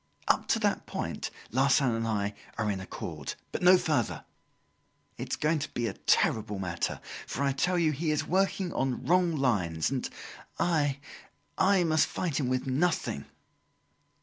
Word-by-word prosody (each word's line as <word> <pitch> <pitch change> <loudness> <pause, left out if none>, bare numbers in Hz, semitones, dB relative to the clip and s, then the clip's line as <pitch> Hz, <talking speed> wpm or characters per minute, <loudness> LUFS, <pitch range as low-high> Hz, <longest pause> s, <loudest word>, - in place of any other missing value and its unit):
Up - - +2
to - - +3
that - - 0
point, - - -3 0.2
Larsan 135 0 +3
and 115 0 -1
I 105 -2 -1 0.2
are 105 -1 0
in 95 - -3
accord; 95 - -6 0.2
but - - -3
no 180 +1 +8
further. 150 -10 -1 0.9
It - - -5
is - - 0
going 155 +1 +1
to 145 - -4
be 120 - -1
a 105 - -2
terrible 105 0 +1
matter; 85 -3 -2 0.3
for 140 - -2
I 140 - +2
tell 180 +7 +1
you 165 -3 +3
he 155 +3 -2
is 155 0 +1
working 190 0 +1
on 130 -2 -1
wrong 175 -1 +3
lines, 100 - +1
and 135 -2 -2 0.5
I 145 -5 +1 0.6
I, 190 -1 +4
must 155 -2 +3
fight 165 -6 -2
him 130 -4 0
with 130 +1 0
nothing!" 135 - 0
140 Hz, 165 wpm, -29 LUFS, 115-165 Hz, 0.9 s, no